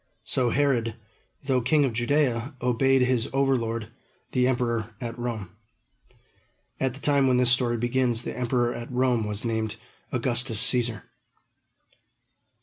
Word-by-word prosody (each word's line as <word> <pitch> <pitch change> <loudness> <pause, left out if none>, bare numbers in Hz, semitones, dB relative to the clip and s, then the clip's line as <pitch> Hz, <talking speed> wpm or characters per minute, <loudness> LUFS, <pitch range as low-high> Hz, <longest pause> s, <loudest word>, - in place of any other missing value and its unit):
So 125 -2 0
Herod, 120 -4 +1 0.5
though 130 -2 +1
king 145 +4 +3
of 125 - -2
Judea, 125 +1 0
obeyed 130 +2 +2
his 125 -3 0
overlord, 115 -5 0 0.4
the 125 -1 +2
emperor 115 -3 -1
at 115 -1 -5
Rome. 115 -7 -5 1.3
At 130 -1 -1
the - - -10
time 140 -2 +2
when 125 -1 +3
this 125 -1 +4
story 125 -1 +2
begins, 120 0 0
the - - -5
emperor 120 -1 0
at 120 +1 -7
Rome 125 -3 +1
was 105 +2 -4
named 110 -2 -2 0.4
Augustus 120 -3 +1
Cæsar. 120 -3 +1
120 Hz, 135 wpm, -26 LUFS, 115-130 Hz, 1.3 s, this